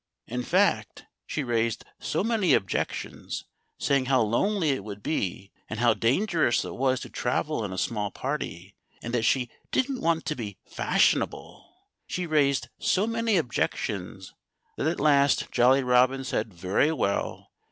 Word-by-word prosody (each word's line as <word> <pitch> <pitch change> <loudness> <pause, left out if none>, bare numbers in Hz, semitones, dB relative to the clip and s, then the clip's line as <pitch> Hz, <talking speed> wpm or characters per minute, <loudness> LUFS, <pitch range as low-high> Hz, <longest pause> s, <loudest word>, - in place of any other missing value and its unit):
In 125 +2 -3
fact, 125 - +1 0.2
she 150 - -2
raised 115 -2 0
so - - -1
many 220 -5 +3
objections, 95 - -3 0.3
saying 140 -2 +1
how 130 -3 +4
lonely 160 - +1
it 130 -7 -2
would 100 -1 -8
be 95 - -2 0.2
and 110 - -4
how 120 -1 +4
dangerous 135 - +1
it - - -6
was 130 0 +1
to - - -7
travel 125 +1 -1
in 100 - -4
a 95 - -5
small 105 +1 -1
party 100 - -5 0.3
and 120 - -5
that 115 -2 +1
she 125 -2 +1 0.2
didn't 260 0 0
want 165 -1 +1
to 155 -1 -1
be 105 -6 -6
fashionable - - 0 0.4
she 180 - -3
raised 145 -5 +2
so 195 +3 +2
many 230 -2 +1
objections 100 - -2 0.4
that - - -1
at 165 - -1
last 140 -2 +3
Jolly 130 +3 +4
Robin 125 +2 +3
said 115 - -2
very 95 - +1
well! 100 -10 -2
130 Hz, 150 wpm, -27 LUFS, 110-155 Hz, 0.4 s, how